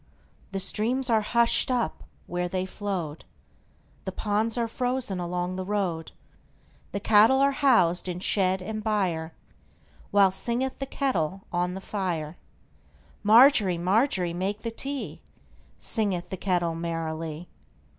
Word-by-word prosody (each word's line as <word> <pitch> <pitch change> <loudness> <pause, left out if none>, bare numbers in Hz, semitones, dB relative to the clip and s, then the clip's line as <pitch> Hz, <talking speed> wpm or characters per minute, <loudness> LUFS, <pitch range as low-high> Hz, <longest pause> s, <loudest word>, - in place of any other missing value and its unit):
The 195 - -3
streams 245 +6 0
are 220 -1 +4
hushed 235 +4 +2
up 245 -2 -1 0.2
where 180 0 -2
they 185 0 -1
flowed, 185 -6 -4 0.8
The - - -2
ponds 215 +2 0
are 235 -1 +1
frozen 245 -4 -2
along 180 +1 -2
the 185 - -3
road, 185 -5 -2 0.8
The 200 - -2
cattle 215 +5 +5
are 275 +1 +4
housed 185 - +3
in 180 0 -4
shed 185 -1 +1
and 215 +2 -5
byreWhile 190 0 -1
singeth 240 +6 -1
the 270 - -3
kettle 195 - -1
on 180 +1 0
the 190 - -6
fire. 175 -7 -3 0.9
Margery, 215 -4 +6
Margery, 185 -1 +1
make 195 +4 -3
the 230 - -2
tea, 275 +4 -5 0.6
Singeth 200 -6 0
the - - -2
kettle 175 -3 0
merrily. 165 0 -4
195 Hz, 125 wpm, -26 LUFS, 175-230 Hz, 0.9 s, Margery